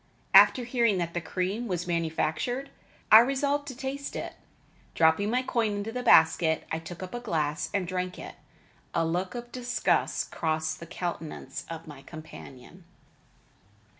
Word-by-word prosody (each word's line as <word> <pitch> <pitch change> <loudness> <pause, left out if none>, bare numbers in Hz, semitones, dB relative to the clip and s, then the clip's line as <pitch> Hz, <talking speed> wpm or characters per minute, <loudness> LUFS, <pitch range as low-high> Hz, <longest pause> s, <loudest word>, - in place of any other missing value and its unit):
After 250 - +7
hearing 235 -4 +2
that 170 -1 -2
the 175 - -2
cream 185 +8 -2
was 180 -3 -2
manufactured, 170 - -1 0.4
I 215 - +12
resolved 280 +3 +1
to 260 - -6
taste 270 +1 -5
it. - - -5 0.6
Dropping 160 +5 +3
my 250 +3 +1
coin 230 -4 0
into 205 +2 -4
the 250 +2 -3
basket, 160 -7 +5
I 160 - -1
took 170 +2 -8
up 185 - -8
a 240 - -3
glass 155 -9 -1
and 195 -3 -1
drank 180 0 -3
it. - - -8 0.6
A 165 - +2
look 180 +6 -2
of 240 0 -7
disgust 245 0 0
crossed 160 -1 -1
the 170 - -9
countenance 160 -5 -5
of 165 0 -7
my 145 -4 -11
companion. 155 +2 -12
180 Hz, 155 wpm, -28 LUFS, 160-240 Hz, 0.6 s, I